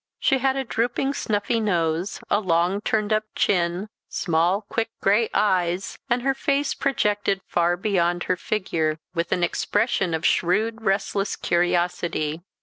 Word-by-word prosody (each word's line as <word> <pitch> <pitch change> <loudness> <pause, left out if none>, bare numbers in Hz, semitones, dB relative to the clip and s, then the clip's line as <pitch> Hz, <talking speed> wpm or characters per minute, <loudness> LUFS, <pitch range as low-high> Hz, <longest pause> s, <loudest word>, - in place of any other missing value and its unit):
She 270 - +2
had 265 +1 +1
a 270 - -1
drooping 245 +3 -1
snuffy 220 -1 -1
nose, 175 -3 0
a 205 - +2
long 180 +1 +1
turned 215 0 0
up 215 0 +2
chin, 175 +1 +1 0.2
small 175 +4 +1
quick 225 +2 -2
gray 210 +4 +3
eyes, 185 -2 0
and 240 0 +1
her 270 0 +2
face 280 +1 0
projected 205 -7 0
far 175 0 +1
beyond 175 -3 +1
her 185 - 0
figure, 170 -6 -1 0.2
with 170 -1 -2
an 175 - +1
expression 195 -2 0
of 160 - -3
shrewd 220 +6 +1
restless 195 0 0
curiosity. 175 -2 0
195 Hz, 145 wpm, -24 LUFS, 175-220 Hz, 0.2 s, gray